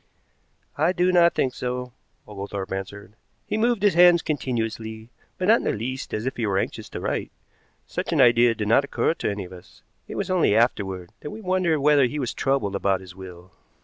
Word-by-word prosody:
"I 165 +4 +3
do 180 0 +2
not 170 -1 +4
think 130 - 0
so," 125 0 -4 0.3
Oglethorpe 100 -1 -6
answered. 100 +2 -6 0.3
"He - - -3
moved 230 -1 +1
his 205 -3 +4
hands 175 0 +6
continuously, 115 -5 -3 0.3
but 185 - -2
not 225 +2 +6
in - - -6
the - - 0
least 125 +5 -5
as 110 +2 -3
if 130 - -3
he 115 -3 -1
were 95 -1 0
anxious - - -3
to - - -6
write. - - -3 0.5
Such - - -4
an - - +1
idea 120 -1 +5
did 105 -2 -3
not 115 +6 +4
occur 140 - 0
to - - -3
any 100 -1 -4
of 90 - -12
us. 90 -1 -15 0.2
It - - -7
was - - -3
only 175 - +3
afterward 95 -6 0
that 150 - -7
we 215 - -8
wondered 185 -6 0
whether 145 -1 +5
he 145 +5 -3
was 130 -4 -2
troubled 135 -8 0
about 95 -1 0
his 95 -1 -12
will." 90 -1 -11
120 Hz, 210 wpm, -24 LUFS, 100-160 Hz, 0.5 s, hands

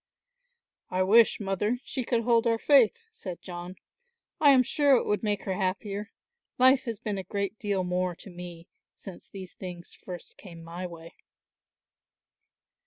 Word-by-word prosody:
"I 185 +1 +1
wish, 220 +4 +5
Mother, 205 +3 -1
she 260 -2 -3
could 235 -1 0
hold 235 0 +3
our 230 -1 +2
faith," 275 - +4
said 185 - -7
John. 175 0 -7 0.6
"I 295 - +6
am 260 -2 +7
sure 285 +2 +3
it - - +1
would 210 - 0
make 205 -2 -1
her 190 - -2
happier. 200 +2 -2 0.5
Life 260 +1 +5
has 230 -3 -3
been 205 -2 -3
a - - -5
great 200 +2 -3
deal 200 -3 -1
more 180 0 -1
to 195 - -12
me 175 -1 -9 0.3
since 190 -3 -11
these 190 -2 -9
things 175 -2 -9
first 180 -2 -10
came 170 -4 -12
my 175 +2 -6
way." 165 -1 -11
195 Hz, 160 wpm, -28 LUFS, 180-230 Hz, 0.6 s, am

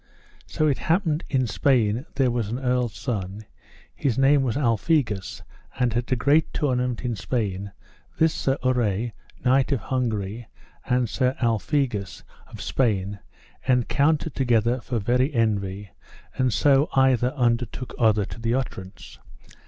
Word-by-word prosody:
So 155 - 0
it 140 - +1
happened 165 -2 +1
in 130 -3 +1
Spain 120 0 +1
there 130 -2 +2
was 120 -4 -2
an 120 - -2
earl's 125 -3 0
son, 105 -4 -4 0.5
his 130 -5 -1
name 135 +1 +4
was 125 -2 -1
Alphegus, 115 - 0 0.4
and 125 -3 +2
at 120 +1 -2
a - - +4
great 145 +6 +2
tournament 125 -3 -1
in 120 -2 -1
Spain 100 -3 -3 0.5
this 160 0 +3
Sir 135 0 0
Urre, 120 -3 +1 0.3
knight 130 +2 +3
of 135 - +1
Hungary, 110 -2 -3 0.4
and 125 -1 +2
Sir 130 +5 0
Alphegus 115 - -1 0.2
of - - -9
Spain 100 -5 0 0.5
encountered 140 +5 +2
together 120 -1 +1
for 120 - -3
very 125 +6 +1
envy; 100 -3 -1 0.4
and 130 -1 +1
so 140 +5 +3
either 130 -2 +3
undertook 120 -1 -1
other 110 -3 +3
to 95 +3 -9
the 115 +1 +1
utterance. 95 -7 -6
125 Hz, 135 wpm, -24 LUFS, 110-135 Hz, 0.5 s, name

